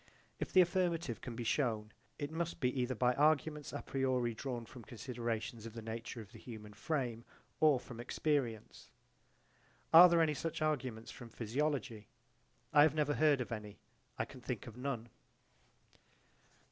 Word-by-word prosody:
If - - -3
the 185 - +7
affirmative 175 -7 0
can 120 - -6
be 120 - -4
shewn 115 -3 0 0.3
it 145 0 -4
must 170 +1 -3
be 125 -2 +1
either 125 +1 -1
by 125 +2 +3
arguments 150 +1 +2
a - - -5
priori 130 -3 0
drawn 120 0 -4
from 120 +1 -12
considerations 115 -1 -4
of 115 - -10
the 115 - -5
nature 115 +1 -5
of 105 -1 -13
the - - -12
human 105 -3 -9
frame 120 -1 -2 0.4
or 150 -4 +5
from 120 -1 -10
experience. 120 -3 -2 1.0
Are 175 +2 +11
there 170 -1 +5
any 155 -1 +2
such 165 +2 -3
arguments 130 -7 -1
from 120 - -10
physiology? 120 -1 -2 0.7
I 145 - +8
have 155 0 +5
never 150 -1 +2
heard 150 -3 +4
of 120 - -5
any: 105 -2 -6 0.4
I - - 0
can - - -12
think - - -4
of 115 - -9
none. 125 -3 -4
125 Hz, 160 wpm, -35 LUFS, 115-150 Hz, 1.0 s, Are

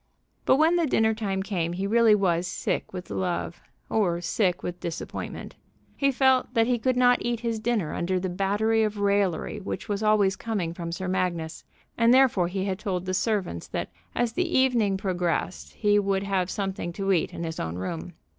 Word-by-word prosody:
But - - +5
when 320 +4 +4
the 335 -2 +2
dinner 220 -3 +3
time 195 -3 -2
came 175 -4 -2
he 190 +3 -2
really 225 +1 +5
was 180 -3 +1
sick - - -2
with 180 -1 -7
love, 180 -2 -2 0.3
or 180 -6 +1
sick 180 0 0
with 175 0 -4
disappointment. 170 0 -6 0.4
He 275 -1 +2
felt 260 -1 +2
that 225 -1 +4
he 245 0 +1
could 255 +2 +1
not 245 -1 +5
eat 235 -1 -2
his 230 -2 -2
dinner 215 -7 -1
under 185 +2 -1
the 185 - -2
battery 205 +5 +1
of 215 -1 0
raillery 200 -1 0
which 200 - -5
was 205 -1 -2
always 210 -3 +3
coming 200 -8 -3
from 170 -1 -5
Sir 185 +2 -4
Magnus, 175 -4 -2 0.4
and 230 0 +5
therefore 250 -9 +4
he 190 +2 -2
had 190 -1 -2
told 185 -3 -2
the 185 - -2
servants 190 - -1
that - - -4 0.2
as 240 -2 0
the 350 +3 0
evening 235 -7 +3
progressed 165 - -2
he 205 0 +3
would 195 -1 0
have 190 -2 0
something 195 -3 -3
to 195 +1 -1
eat 170 - +1
in - - -6
his 160 -1 -4
own 80 +1 -3
room. 160 - -5
195 Hz, 195 wpm, -26 LUFS, 180-225 Hz, 0.4 s, But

